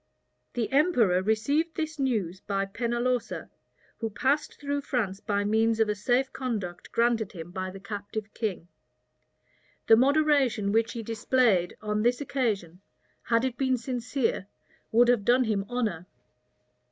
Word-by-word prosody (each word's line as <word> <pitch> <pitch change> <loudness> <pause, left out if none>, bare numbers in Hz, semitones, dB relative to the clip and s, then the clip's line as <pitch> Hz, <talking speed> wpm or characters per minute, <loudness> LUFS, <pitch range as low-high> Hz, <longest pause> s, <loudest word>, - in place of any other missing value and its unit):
The 240 0 -1
emperor 250 - +3
received 280 - 0
this 315 -1 -3
news 210 -10 -1
by 195 -1 -1
Pennalosa, 240 +3 -2 0.5
who 225 - -2
passed 265 +8 0
through 285 0 -2
France 215 -9 -2
by 205 -1 -1
means 220 +2 +2
of 220 -1 +3
a - - +2
safe 245 +6 0
conduct 210 -9 -4
granted 230 -3 +1
him 170 -1 -8
by 185 0 -4
the 195 +1 -9
captive 205 +1 -6
king. 200 -7 -3 1.2
The 225 - +7
moderation 270 -5 +3
which 225 +1 +1
he 230 - -5
displayed 225 -4 +1
on 210 0 0
this 240 +2 +2
occasion, 210 - -2 0.4
had 230 +1 +1
it 245 -2 -3
been 260 -2 +2
sincere, 245 -3 -2 0.4
would 235 +2 +5
have 240 -4 +3
done 245 +4 +4
him 210 -4 -1
honor. 210 -9 -2
230 Hz, 140 wpm, -27 LUFS, 200-255 Hz, 1.2 s, The